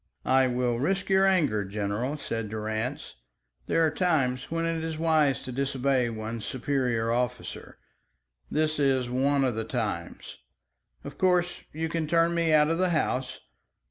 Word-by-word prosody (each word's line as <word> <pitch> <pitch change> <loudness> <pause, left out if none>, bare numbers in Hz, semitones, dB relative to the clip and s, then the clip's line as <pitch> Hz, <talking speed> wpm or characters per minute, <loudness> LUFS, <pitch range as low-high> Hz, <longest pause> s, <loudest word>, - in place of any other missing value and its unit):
"I 130 0 +4
will 125 -1 0
risk 190 +9 -1
your 190 0 +5
anger, 150 - +2
General," 105 +8 -2
said 115 -6 -4
Durrance. 110 +5 -4 0.5
"There 165 - +3
are 155 - +1
times 135 -9 0
when 165 0 -1
it 165 -1 -1
is 160 -1 -3
wise 155 -4 +2
to 130 - -6
disobey 135 -1 0
one's 110 0 -5
superior 125 -4 -1
officer. 125 0 -3 0.7
This 155 0 0
is 130 -3 +1
one 135 +2 +2
of 130 -2 +1
the 110 +1 -2
times. 110 -8 -4 0.7
Of - - -9
course 180 -1 +2
you 160 +2 -3
can 160 -1 -2
turn 165 +1 +3
me 170 -1 +1
out 150 0 +5
of 165 - 0
the 185 -1 +2
house. 135 -6 -1
135 Hz, 155 wpm, -27 LUFS, 120-160 Hz, 0.7 s, your